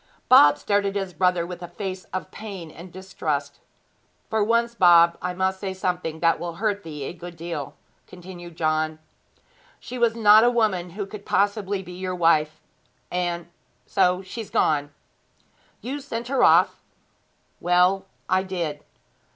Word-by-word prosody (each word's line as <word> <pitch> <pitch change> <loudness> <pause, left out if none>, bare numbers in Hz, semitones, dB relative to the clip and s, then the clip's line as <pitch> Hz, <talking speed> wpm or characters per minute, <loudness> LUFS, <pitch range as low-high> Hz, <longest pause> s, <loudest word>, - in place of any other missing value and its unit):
Bob 145 - +8
stared 205 +6 +1
at 195 - -4
his 195 -2 -3
brother 180 0 +1
with 180 0 -8
a 175 - -6
face 185 +1 -6
of 185 - -6
pain 195 -7 -8
and 170 +3 -12
distrust. 155 -6 -4 0.7
'For 220 -1 +2
once, 235 +2 +1
Bob, 170 -5 +6
I 180 0 -3
must 190 +1 0
say 190 -1 -4
something 180 -4 -3
that 165 -1 +3
will 170 -1 -4
hurt 205 +1 -1
thee 150 -5 -7
a 135 - -5
good 175 0 -10
deal,' 165 -4 -5 0.3
continued 175 -2 -11
John. 155 0 0 0.8
'She 250 - -7
was 235 -1 +2
not 215 -1 +7
a 240 - +5
woman 210 -7 0
who 205 - -2
could 200 +1 -10
possibly 200 -1 0
be 180 0 -10
your 185 0 -4
wife 155 -3 +2 0.5
and 175 -1 -2 0.4
so 185 -1 +1
she's 215 +3 -7
gone.' 145 -2 +1 0.9
'You 275 +4 -4
sent 240 -4 -6
her 270 - +2
off?' - - +4 0.8
'Well, 180 +2 +2 0.2
I 185 0 +2
did.' 170 -6 -4
180 Hz, 155 wpm, -24 LUFS, 170-200 Hz, 0.9 s, Bob